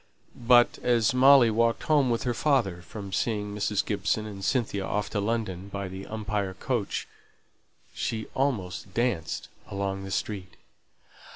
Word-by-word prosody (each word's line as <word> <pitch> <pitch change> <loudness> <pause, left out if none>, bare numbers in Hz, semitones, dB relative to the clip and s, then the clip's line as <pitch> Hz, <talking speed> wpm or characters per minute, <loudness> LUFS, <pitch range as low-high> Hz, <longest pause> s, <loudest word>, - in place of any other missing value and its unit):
But 120 0 +4
as 120 -2 +3
Molly 130 -2 +7
walked 115 +1 +1
home 145 -4 +3
with 115 -1 0
her 125 - 0
father 115 - +1
from 100 +1 -8
seeing 105 -1 -1
Mrs. 105 -1 0
Gibson 105 +1 0
and 100 -2 -7
Cynthia 105 -4 0
off 105 +1 -2
to 105 - -1
London 100 -3 -2
by 100 -1 -4
the 95 +1 -8
"Umpire" 105 -3 -3
coach, 115 +1 -2 0.9
she 110 -1 -3
almost 100 - -2
danced 115 -10 -1 0.2
along 95 0 -3
the 95 - -6
street. 95 -2 -3
105 Hz, 145 wpm, -27 LUFS, 95-120 Hz, 0.9 s, Molly